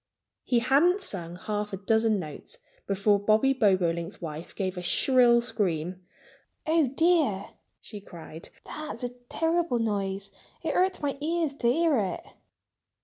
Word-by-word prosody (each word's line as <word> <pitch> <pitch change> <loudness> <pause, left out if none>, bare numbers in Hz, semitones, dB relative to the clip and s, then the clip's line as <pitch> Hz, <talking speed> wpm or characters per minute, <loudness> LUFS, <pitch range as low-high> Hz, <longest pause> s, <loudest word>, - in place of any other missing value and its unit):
He 245 - +1
hadn't 280 - +4
sung 175 - -5
half 210 +2 -4
a - - -2
dozen 220 +2 +2
notes 155 -6 -8 0.3
before 200 +1 +2
Bobby 215 +6 +3
Bobolink's 180 -8 +1
wife 160 0 -7
gave 190 -2 -2
a 180 - -5
shrill 240 +5 +4
scream. 185 -6 -2 0.6
"Oh, 315 -2 +3
dear!" 315 - +2 0.3
she 210 -2 -9
cried. 165 -3 -11 0.2
"That's 305 -3 -6
a 245 - -1
terrible 325 +5 -1
noise. 200 -3 -2 0.3
It - - -1
hurts 370 -3 +1
my 275 -1 -2
ears 325 -1 0
to 270 -4 -1
hear 320 0 +2
it." 190 -4 -2
220 Hz, 140 wpm, -27 LUFS, 190-280 Hz, 0.6 s, hadn't